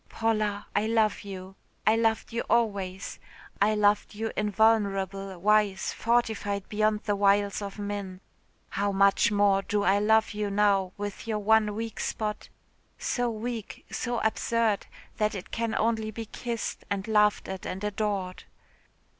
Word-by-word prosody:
"Paula, 215 -2 0
I 210 +1 +2
love 220 -2 +2
you. 190 -2 -8 0.3
I 215 - +5
loved 225 0 0
you 235 - 0
always. 200 -5 0 0.4
I 215 +2 +4
loved 210 0 +2
you 225 +1 -3
invulnerable, 195 -3 +1
wise, 205 0 +2
fortified 220 -4 0
beyond 215 0 +1
the 205 - 0
wiles 200 0 +2
of 200 0 -6
men. 200 -2 -4 0.5
How 200 0 0
much 200 +2 +4
more 200 -1 +3
do 205 +1 -1
I 200 +1 +4
love 220 +1 +3
you 210 -1 -2
now 200 -2 +2
with 205 +1 -6
your 220 -2 0
one 210 0 +3
weak 225 0 -5
spot 210 -1 -3 0.5
so 245 -1 -1
weak, 230 0 -5
so 240 -1 -2
absurd 220 -1 +1 0.3
that 210 0 +1
it 195 +2 -7
can 230 -1 -1
only 220 -1 0
be 225 +1 -6
kissed, 235 +1 -4
and 195 0 -2
laughed 210 -1 +3
at 190 -1 -6
and 190 +2 -5
adored. 205 -3 -2
210 Hz, 145 wpm, -28 LUFS, 200-220 Hz, 0.5 s, I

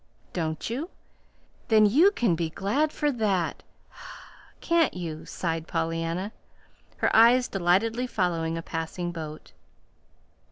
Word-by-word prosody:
"Don't 160 -3 -3
you? 270 +10 -4 0.8
Then 215 -2 +5
you 295 - +6
can 240 - +1
be 165 0 -1
glad 230 - 0
for 295 -1 0
that, 200 -8 -1 1.0
can't 335 - +2
you?" 165 -3 -6
sighed 165 -2 -3
Pollyanna, 165 +4 -2 0.7
her - - +1
eyes 240 +3 +6
delightedly 205 +7 +1
following 165 -6 -1
a 165 - -5
passing 175 +2 -4
boat. 155 -2 -8
180 Hz, 115 wpm, -26 LUFS, 165-235 Hz, 1.0 s, you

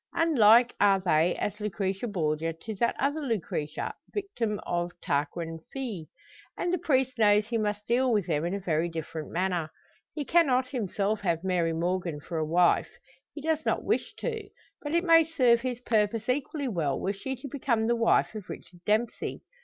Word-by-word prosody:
Unlike 245 -7 +5
are 200 -1 +5
they 175 -2 +2
as 205 +1 -3
Lucrezia 200 +1 -2
Borgia 165 -3 -1
to 220 +7 -7
that 235 +4 +1
other 285 +3 0
Lucretia 190 - -3 0.2
victim 245 - -2
of 175 0 -1
Tarquin 165 +1 -2
fils. 225 - -5 0.5
And 355 - -1
the 360 - +1
priest 260 -6 +1
knows 210 -1 +5
he 230 +1 -1
must 210 -1 -2
deal 250 +2 +2
with 210 -5 +2
them 155 -4 0
in 175 +3 -1
a - - -3
very 170 -2 0
different 160 -1 -6
manner. 175 -3 -1 0.5
He 295 -2 -3
cannot 260 -7 +3
himself 210 -3 -1
have 170 -3 0
Mary 180 -3 +1
Morgan 170 -1 -1
for 160 +2 -4
a - - +1
wife 175 +2 +3 0.5
he 295 - -6
does 315 +1 0
not - - 0
wish - - -1
to 445 -3 -4 0.3
but 295 +2 -3
it 340 - +3
may 330 -2 +7
serve 255 -7 +3
his 250 -1 -3
purpose 220 -2 +1
equally 280 +2 -1
well 165 - -1
were 195 - -1
she 265 +7 -5
to 260 +2 -8
become 240 -4 0
the 235 +1 +2
wife 230 -1 +2
of 215 -3 -8
Richard 175 - -10
Dempsey. 220 +3 -1
210 Hz, 180 wpm, -28 LUFS, 175-255 Hz, 0.5 s, may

